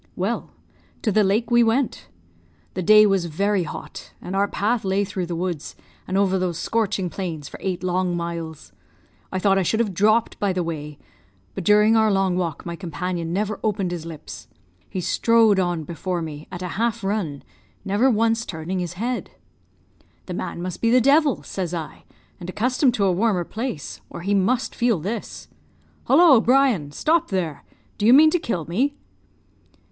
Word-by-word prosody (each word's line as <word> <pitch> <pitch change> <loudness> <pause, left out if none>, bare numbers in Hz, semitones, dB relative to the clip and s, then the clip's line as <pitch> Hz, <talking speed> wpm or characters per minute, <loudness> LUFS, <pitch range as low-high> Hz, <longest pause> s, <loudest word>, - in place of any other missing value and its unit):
"Well, - - -2 0.5
to 220 - +1
the 215 +2 +4
lake 210 +5 +1
we 240 0 +6
went. 225 - 0 0.7
The 185 - -3
day 215 +4 +7
was 195 -4 +2
very 195 +5 0
hot, 165 - -8
and 185 - -6
our 200 +1 +2
path 220 +4 -1
lay 195 +1 +1
through 190 -3 -4
the 170 - -3
woods, 170 -3 -4 0.3
and 185 - -1
over 190 -1 +2
those 180 -3 -1
scorching 210 -4 -1
plains, 165 -5 -5
for - - -10
eight 185 -2 -3
long 180 -1 0
miles. 170 -2 -6 0.6
I - - -2
thought 195 0 +3
I - - +2
should 220 +5 0
have 215 -5 0
dropped 215 +5 +2
by 200 -2 +1
the 180 -1 -1
way; 150 -3 -5 0.6
but - - -5
during 210 +4 +5
our 220 -1 +4
long 195 -2 +1
walk 170 -5 -3
my 170 -1 -4
companion 170 0 -4
never 210 +3 -2
opened 200 -4 0
his 175 -2 -4
lips. 165 -2 -9 0.4
He 185 - -3
strode 225 +1 +3
on 175 -3 0
before 170 +2 -3
me, 150 -1 -8
at 180 0 -6
a - - -3
half 230 -1 0
run, 195 -8 -2 0.4
never 210 +7 +3
once 225 0 +2
turning 175 0 -4
his 175 -1 -3
head. 240 +7 -3 1.0
"'The 180 - -6
man 175 -1 -5
must 180 -1 -5
be 230 - +3
the 250 +2 +5
devil!' 285 +3 +3
says 180 -3 -4
I, 160 -2 -7 0.3
'and 175 0 -7
accustomed 250 +5 +1
to 200 - +1
a 190 - +3
warmer 190 -1 +1
place, 215 - -5
or - - -8
he 200 +3 -1
must 235 +6 +1
feel 235 -4 +1
this. 205 +9 -5 0.6
Hollo, 315 -9 +6
Brian! 245 - +2
Stop 320 - +1
there! 175 -6 -2 0.4
Do 210 - +2
you 240 - +8
mean 310 +3 +7
to 355 - +2
kill 180 - -3
me?' 255 - 0
195 Hz, 180 wpm, -23 LUFS, 175-225 Hz, 1.0 s, you